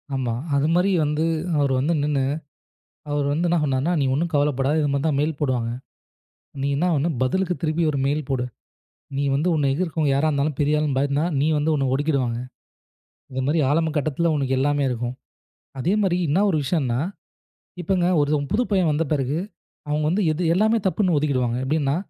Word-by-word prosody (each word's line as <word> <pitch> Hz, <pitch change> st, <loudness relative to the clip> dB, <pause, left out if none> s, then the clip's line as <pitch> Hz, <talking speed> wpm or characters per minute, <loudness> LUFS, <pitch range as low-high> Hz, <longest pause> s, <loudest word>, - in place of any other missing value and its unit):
ஆமா. 125 Hz, -3 st, -1 dB, 0.2 s
அது 140 Hz, +2 st, +2 dB
மாதிரி 180 Hz, +3 st, +3 dB
வந்து, 150 Hz, +1 st, 0 dB, 0.3 s
அவர் 140 Hz, -2 st, +2 dB
வந்து 150 Hz, +6 st, +1 dB
நின்னு, 145 Hz, -2 st, 0 dB, 0.9 s
அவர் 145 Hz, -1 st, 0 dB
வந்து 165 Hz, +4 st, 0 dB
என்ன 175 Hz, 0 st, +2 dB
சொன்னார்னா? 140 Hz, +3 st, 0 dB
"நீ -, -, +2 dB
ஒன்னும் 165 Hz, +5 st, -1 dB
கவலைப்படாத. 145 Hz, -1 st, +1 dB
இது 145 Hz, -, +1 dB
மாதிரிதான் 140 Hz, +1 st, 0 dB
மெயில் 150 Hz, 0 st, -1 dB
போடுவாங்க. 125 Hz, -5 st, 0 dB, 0.9 s
நீ 140 Hz, -, 0 dB
என்ன 155 Hz, +6 st, +1 dB
ஆகணும்? 155 Hz, 0 st, 0 dB
பதிலுக்குத் 180 Hz, +8 st, 0 dB
திருப்பி 160 Hz, +1 st, 0 dB
ஒரு 145 Hz, -, -2 dB
மெயில் 145 Hz, 0 st, -1 dB
போடு. 130 Hz, -2 st, 0 dB, 0.7 s
நீ 140 Hz, -, 0 dB
வந்து 150 Hz, +6 st, +1 dB
உன்னை 145 Hz, -3 st, +1 dB
எதிர்க்கவங்க 160 Hz, -2 st, 0 dB
யாரா 145 Hz, +3 st, +2 dB
இருந்தாலும் 145 Hz, 0 st, -1 dB
பெரிய 150 Hz, +1 st, +2 dB
ஆளுன்னு 150 Hz, -3 st, 0 dB
பயந்தா, 140 Hz, +2 st, +1 dB, 0.2 s
நீ 145 Hz, -, +2 dB
வந்து 150 Hz, +2 st, 0 dB
உன்னை 140 Hz, -2 st, 0 dB
ஒடுக்கிடுவாங்க. 135 Hz, -5 st, 0 dB, 1.0 s
இது 130 Hz, -, -1 dB
மாதிரி 155 Hz, +3 st, +2 dB
ஆரம்ப 160 Hz, +2 st, +1 dB
கட்டத்துல 155 Hz, +3 st, 0 dB
உனக்கு 135 Hz, -2 st, 0 dB
எல்லாமே 145 Hz, +1 st, +1 dB
இருக்கும். 120 Hz, 0 st, -3 dB, 0.6 s
அதே 160 Hz, +8 st, 0 dB
மாதிரி 185 Hz, -3 st, +2 dB
என்ன 180 Hz, +8 st, +3 dB
ஒரு 160 Hz, -, +1 dB
விஷயம்னா? 130 Hz, -5 st, 0 dB, 0.8 s
இப்ப 180 Hz, 0 st, +1 dB
ஒரு 145 Hz, 0 st, +1 dB
புது 225 Hz, +4 st, +2 dB
பையன் 185 Hz, -5 st, +3 dB
வந்த 155 Hz, +2 st, 0 dB
பிறகு, 140 Hz, +1 st, 0 dB, 0.5 s
அவங்க 150 Hz, +1 st, 0 dB
வந்து 195 Hz, +5 st, +1 dB
எது? 160 Hz, +4 st, -3 dB
எல்லாமே 220 Hz, +4 st, +3 dB
தப்புன்னு 185 Hz, -3 st, +2 dB
ஒதுக்கிடுவாங்க. 130 Hz, -5 st, 0 dB
எப்படின்னா, 140 Hz, 0 st, 0 dB
150 Hz, 175 wpm, -23 LUFS, 135-165 Hz, 1.0 s, மாதிரி